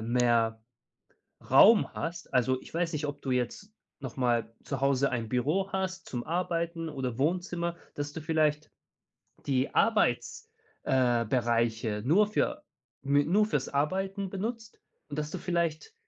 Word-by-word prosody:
mehr 115 -1 +1 0.9
Raum 205 - +7
hast. 170 +1 -5
Also, 130 +1 +2
ich - - -15
weiß 170 0 0
nicht, 150 0 -2
ob 145 0 -6
du 135 - -3
jetzt 125 - -2 0.3
noch 130 -2 -7
mal 120 -3 0
zu 135 -2 -4
Hause 140 0 +2
ein 115 -3 -3
Büro 155 +11 0
hast 190 0 -3
zum 120 -2 -4
Arbeiten 170 -1 -2
oder 130 -4 -4
Wohnzimmer, 170 +2 -1 0.2
dass 145 0 -4
du 160 - -6
vielleicht 155 -1 0 0.8
die 135 -1 0
Arbeits 225 - +1 0.4
äh, 125 -3 +2
Bereiche 115 -2 0
nur 200 +9 +4
für 300 +7 -1 0.4
mü 145 +1 +4
nur 200 +6 +4
für‘s - - -1
Arbeiten 190 +7 -1
benutzt 225 +3 -5 0.3
und 145 - -5
dass 150 0 -2
du - - -4
vielleicht 170 - -2
150 Hz, 145 wpm, -29 LUFS, 125-180 Hz, 0.9 s, Raum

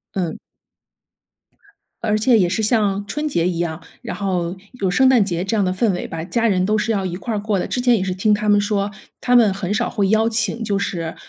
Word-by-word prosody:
嗯。 175 -5 -2 1.7
而 215 -2 +1
且 230 +2 +4
也 180 -4 +2
是 220 +4 -1
像 205 -3 +1
春 300 +9 -3
节 170 - 0
一 175 -2 -2
样， 165 -2 -2 0.2
然 - - -5
后 180 -3 -2 0.3
有 190 - +1
圣 260 +9 +4
诞 255 -5 +5
节 175 -3 -2
这 195 +4 -1
样 205 - +2
的 185 - 0
氛 200 +4 +1
围 180 - -4
吧， 165 -1 -5
家 230 +6 0
人 185 -3 +2
都 210 +2 +1
是 210 +2 0
要 195 -3 -1
一 175 -1 -3
块 225 +5 -4
儿 - - -1
过 205 -1 -1
的。 - - -2
之 - - -2
前 245 -1 +4
也 195 - -1
是 190 -1 -2
听 210 +3 +2
他 210 0 0
们 205 0 +5
说， 205 -1 0 0.3
他 245 - +2
们 225 -5 +5
很 195 -1 -4
少 215 - 0
会 200 -2 0
邀 220 +1 +3
请 225 0 -1
就 205 -2 -1
是， 170 -4 -3
205 Hz, 260 characters per minute, -20 LUFS, 185-220 Hz, 1.7 s, 诞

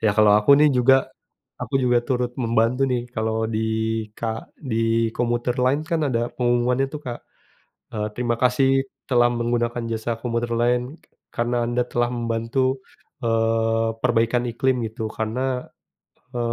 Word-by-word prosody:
Ya 110 - +3
kalau 105 -1 +6
aku 110 - +1
nih 150 +1 +5
juga, 125 +1 +5 0.7
aku - - -6
juga 125 -1 +3
turut 125 -1 0
membantu 115 +3 +1
nih, 125 - 0
kalau 110 0 -1
di 110 -1 -2 0.6
ka 115 - -2 0.3
di 130 -7 -4 0.4
commuter 120 0 0
line 140 +4 +2
kan 165 -1 0
ada 120 0 0
pengumumannya 125 +2 +1
tuh, 150 - -5
Kak. 120 -1 -4 0.7
E - - -6 0.2
terima 120 -1 0
kasih 125 +2 +3 0.4
telah 120 -2 +4
menggunakan 120 0 -1
jasa 115 +1 -2
commuter 120 -1 -2
line, 120 +1 +2 0.4
karena 120 +1 -2
Anda 120 0 0
telah 120 0 0
membantu, 120 +3 -1 0.4
eee, 115 -1 +1
perbaikan 120 0 +1
iklim, 125 +2 0
gitu. 110 0 -5
Karena, 125 +4 -2 0.7
e - - -1
120 Hz, 140 wpm, -23 LUFS, 115-125 Hz, 0.7 s, kalau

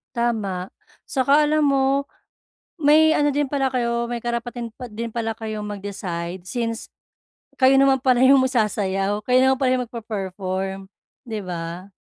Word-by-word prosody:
Tama. 210 -6 -1 0.4
Saka 280 +3 +3
alam 305 0 +2
mo, 275 0 +2 0.7
may 315 0 +5
ano 290 0 +2
din 290 0 0
pala 270 -2 0
kayo, 235 -1 0
may 235 0 -4
karapatan 235 0 -4
pa 245 -3 -9
din 230 +2 -4
pala 225 0 -2
kayo 215 -1 -5
mag-decide 190 -4 -5
since 230 +2 -4 0.7
kayo 265 +1 +6
naman 270 -1 +4
pala 255 0 +3
'yung 270 +1 +7
ma 260 - +2
sasayaw, 205 -4 0
kayo 250 0 +5
naman 265 0 +3
pala 260 -2 +2
'yung 250 - -1
magpe-perform, 195 -4 -5 0.4
'di 220 -2 -3
ba? 175 +2 -6
235 Hz, 150 wpm, -22 LUFS, 200-265 Hz, 0.7 s, yung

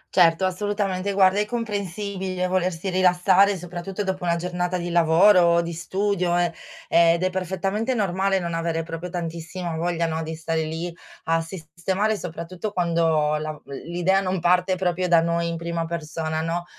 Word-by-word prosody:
Certo 175 0 +5
assolutamente, 200 0 -1
guarda 190 +1 +4
è 210 - +1
comprensibile 200 -4 -3
volersi 185 0 -1
rilassare, 185 +2 +4
soprattutto 180 +3 -5
dopo 190 -1 -3
una 170 0 +2
giornata 180 +1 -2
di 175 0 -4
lavoro 175 +4 +5
o 170 0 +4
di 170 0 -5
studio 180 0 0
eh, 175 -1 +1 0.3
ed 170 - +4
è 185 - +1
perfettamente 195 +6 -1
normale 195 -1 +1
non 170 -2 -3
avere 165 0 -1
proprio 165 +2 -6
tantissimo 170 0 -5
voglia, 170 0 -1
no, 160 0 -2
di 160 0 -5
stare 160 0 -2
lì 165 +2 -4 0.3
a 165 0 +1
sisstemare 185 +5 -2
soprattutto 180 +3 -6
quando 165 -4 +1
la 155 0 -4
v 150 - -15
l 140 - -9 0.2
l'idea 180 +3 +2
non 185 -1 -1
parte 180 +2 +2
proprio 180 0 0
da 170 -1 +5
noi 170 +1 0
in 170 0 -3
prima 170 0 -3
persona, 160 -1 -3
no, 170 +2 -2
175 Hz, 170 wpm, -24 LUFS, 165-190 Hz, 0.3 s, Certo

